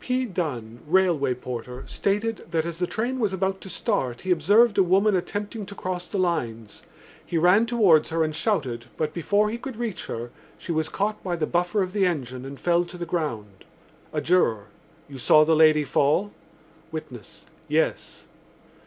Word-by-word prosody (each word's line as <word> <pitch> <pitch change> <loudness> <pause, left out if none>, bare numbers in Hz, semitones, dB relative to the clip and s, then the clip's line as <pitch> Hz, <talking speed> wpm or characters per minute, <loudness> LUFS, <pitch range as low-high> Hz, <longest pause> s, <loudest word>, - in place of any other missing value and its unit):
P. 255 0 0
Dunne, 130 - -4
railway 165 -7 +2
porter, 125 0 -7
stated 210 +2 -2
that 165 -1 0
as 170 0 -5
the 180 - 0
train 245 +6 -2
was 210 -5 0
about 190 +1 -1
to 190 - -9
start 130 - -2
he 185 - -2
observed 205 +7 +4
a - - +8
woman 195 +3 +3
attempting 205 +4 -3
to 200 - -9
cross 180 -2 -4
the 205 - -4
lines. 115 - -2 0.4
He 170 - -3
ran 180 +7 +4
towards 200 -10 +4
her 165 0 +1
and 155 -1 -2
shouted, 150 - -1
but, 155 -1 -1
before 205 +5 +1
he 235 - -4
could 265 -1 -7
reach 225 -5 -4
her, 120 +1 -5 0.3
she - - -6
was 160 -1 0
caught 210 +2 -2
by 180 -2 -1
the 165 -2 -1
buffer 180 +5 +1
of 185 0 -5
the 200 -3 +3
engine 130 -6 -4
and 135 0 -8
fell 175 0 +2
to 180 - -9
the 175 - -4
ground. 115 - -4 0.5
A - - -2
juror. 115 - +2 0.4
"You 140 -2 -10
saw 155 +4 +6
the 160 +1 +3
lady 155 -1 +5
fall?" 150 +8 +1 0.6
Witness. - - -9 0.2
"Yes." - - -1
175 Hz, 180 wpm, -25 LUFS, 150-205 Hz, 0.6 s, a